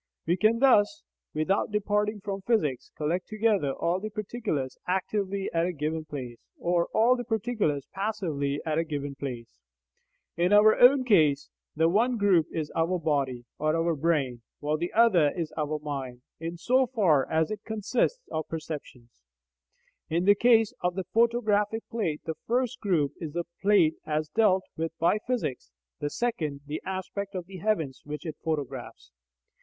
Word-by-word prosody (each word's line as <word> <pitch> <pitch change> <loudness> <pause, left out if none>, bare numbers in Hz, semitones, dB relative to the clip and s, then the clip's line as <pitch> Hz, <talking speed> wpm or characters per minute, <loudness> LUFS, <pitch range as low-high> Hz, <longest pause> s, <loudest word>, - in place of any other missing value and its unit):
We 170 - +2
can 215 +4 +3
thus, 260 +2 +4 0.3
without 155 +6 0
departing 210 0 0
from 195 0 -4
physics, 185 - 0
collect 165 +5 -1
together 215 -9 +1
all 175 +5 0
the 215 +2 -5
particulars 210 - -3
actively 195 +1 -1
at 165 +1 +2
a - - -1
given 155 0 -3
place, 125 -6 -7 0.2
or 175 0 +1
all 235 +3 +4
the 245 - -4
particulars 220 - -1
passively 170 -9 -2
at 155 0 0
a - - +2
given 145 -3 -4
place. 130 -4 -7 0.8
In 175 +4 +2
our 210 +1 +7
own 260 +2 +6
case, 155 - +3 0.2
the 160 +1 +3
one 230 +8 +2
group 190 -7 +3
is 155 -2 -3
our 165 +3 +1
body 140 -7 -1
(or 155 +1 +1
our 165 0 +1
brain), 140 -6 0 0.2
while 150 +1 0
the 170 +3 -3
other 200 -10 +5
is 165 -3 -3
our 155 -1 -1
mind, 135 -4 -6 0.2
in 165 +1 -5
so 255 +8 +2
far 185 - +2
as 160 +2 +1
it 210 -1 -5
consists 235 - -1
of 155 - -3
perceptions. 145 - -8 0.9
In 170 +3 0
the 205 - +7
case 225 0 +4
of 180 0 0
the 190 - -2
photographic 225 -2 +2
plate, 170 -10 -2
the 160 - -2
first 250 +1 0
group 165 - +1
is 155 -3 -6
the 175 - -1 0.2
plate 195 -6 +4
as 155 0 -1
dealt 190 -1 +3
with 165 0 -4
by 170 +6 +2
physics, 225 - -2 0.3
the 145 - -2
second 155 -11 -2
the 150 +1 -4
aspect 195 +1 -4
of 180 -2 -4
the 190 +1 -10
heavens 165 -9 -1
which 150 +3 -7
it 155 -3 -5
photographs. 145 - -4
175 Hz, 165 wpm, -28 LUFS, 150-215 Hz, 0.9 s, our